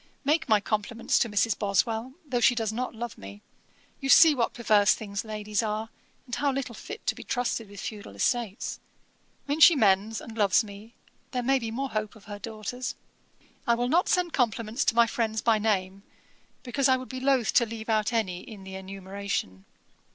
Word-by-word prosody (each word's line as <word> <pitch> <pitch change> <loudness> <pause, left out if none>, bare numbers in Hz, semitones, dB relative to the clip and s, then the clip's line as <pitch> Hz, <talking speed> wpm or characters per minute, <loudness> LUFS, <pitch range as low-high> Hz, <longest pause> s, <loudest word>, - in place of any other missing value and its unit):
'Make 300 0 +1
my 215 -1 +5
compliments 215 +2 0
to 235 - +1
Mrs. 205 +1 +2
Boswell, 220 +5 0
though 260 -4 -1
she 245 +1 +4
does 220 -2 -1
not 250 +1 -3
love 235 +1 -6
me. 100 +1 -11 0.6
You 270 - -4
see 320 +2 +8
what 240 -5 -1
perverse 210 -4 +4
things 200 -2 -5
ladies 210 -1 -2
are, 215 0 -3 0.4
and 245 - -12
how 280 +4 +1
little 265 -3 -3
fit 425 - -9
to - - +1
be - - -10
trusted 240 -3 -2
with 200 -1 -10
feudal 205 - -7
estates. 215 - -1 0.7
When 290 +2 -1
she 330 +1 +9
mends 210 -2 +2
and 225 - -10
loves 205 0 +3
me, 210 +3 -12 0.4
there 250 -1 -1
may 270 +2 +3
be 230 -2 -4
more 265 +4 -3
hope 215 +1 -3
of 215 - -17
her 205 -1 -8
daughters. 225 +3 -5 0.7
'I 235 - +4
will 245 +1 -1
not 345 +6 +3
send 360 -2 +1
compliments 230 -1 0
to - - +2
my 235 0 +6
friends 225 -1 -1
by 225 -2 +3
name, 195 -3 -1 0.6
because 270 +2 +1
I 260 - +5
would 255 0 -8
be 255 - -5
loath 260 -3 +2
to 240 - +5
leave 220 0 -7
any 220 - +2
out 215 +1 0
in 205 -2 -3
the 190 0 -9
enumeration. 190 - -5
225 Hz, 195 wpm, -27 LUFS, 205-245 Hz, 0.7 s, she